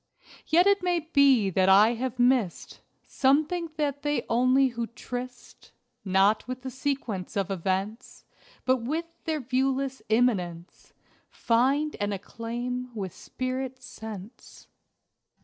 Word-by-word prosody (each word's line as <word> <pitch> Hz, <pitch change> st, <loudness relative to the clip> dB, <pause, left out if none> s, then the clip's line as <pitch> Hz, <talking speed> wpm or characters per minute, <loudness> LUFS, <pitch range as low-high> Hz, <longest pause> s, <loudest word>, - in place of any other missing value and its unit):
Yet 345 Hz, +3 st, +5 dB
it 400 Hz, -1 st, +4 dB
may 355 Hz, -2 st, +1 dB
be 280 Hz, -, +4 dB
that 185 Hz, +1 st, +3 dB
I 210 Hz, +4 st, +6 dB
have 250 Hz, +1 st, -4 dB
missed 245 Hz, -7 st, +1 dB, 0.3 s
Something 310 Hz, +5 st, +1 dB
that 285 Hz, -2 st, -1 dB, 0.3 s
only 255 Hz, +3 st, +4 dB
they -, -, -13 dB
who 235 Hz, -1 st, -3 dB
tryst, 245 Hz, +1 st, -8 dB, 0.3 s
Not 195 Hz, +3 st, +2 dB
with 255 Hz, 0 st, -6 dB
the 260 Hz, -, -5 dB
sequence 245 Hz, -8 st, -3 dB
of 195 Hz, -1 st, -1 dB
events 195 Hz, +4 st, -3 dB, 0.4 s
But 260 Hz, 0 st, +3 dB
with 300 Hz, +8 st, -3 dB, 0.2 s
their 315 Hz, -3 st, -1 dB
viewless 265 Hz, +1 st, -1 dB
Immanence, 185 Hz, -7 st, -1 dB, 0.4 s
Find 270 Hz, +6 st, +1 dB
and 205 Hz, 0 st, -1 dB
acclaim 240 Hz, +5 st, -5 dB
with 190 Hz, -4 st, -4 dB
spirit 255 Hz, 0 st, -5 dB
sense. 220 Hz, -4 st, -10 dB
250 Hz, 120 wpm, -27 LUFS, 215-270 Hz, 0.4 s, I